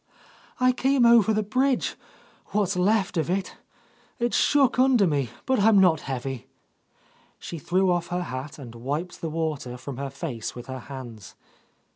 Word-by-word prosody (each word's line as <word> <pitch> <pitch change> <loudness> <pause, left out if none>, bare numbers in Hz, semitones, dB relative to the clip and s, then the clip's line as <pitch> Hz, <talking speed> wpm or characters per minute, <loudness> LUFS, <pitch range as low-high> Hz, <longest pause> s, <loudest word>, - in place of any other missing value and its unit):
"I 255 0 +5
came 260 0 +2
over 235 -3 +6
the 215 0 +1
bridge, 255 +5 +1 0.6
what's 200 -2 +1
left 190 0 +1
of 160 - 0
it. 190 +1 -2 0.6
It 240 -2 -1
shook 275 -4 +3
under 255 -5 +5
me, 140 -7 0 0.2
but 260 -2 +2
I'm 210 +1 +5
not 180 -5 +5
heavy." 130 -1 -4 0.9
She 170 - -7
threw 180 +3 +1
off 175 -1 0
her 180 0 -2
hat 130 -1 -6
and 125 -5 -10
wiped 145 +9 -4
the 165 - -2
water 155 -6 -3
from 130 0 -7
her 140 0 -4
face 135 -5 -5
with 120 0 -8
her 130 0 -6
hands. 120 -6 -10
175 Hz, 160 wpm, -25 LUFS, 135-215 Hz, 0.9 s, over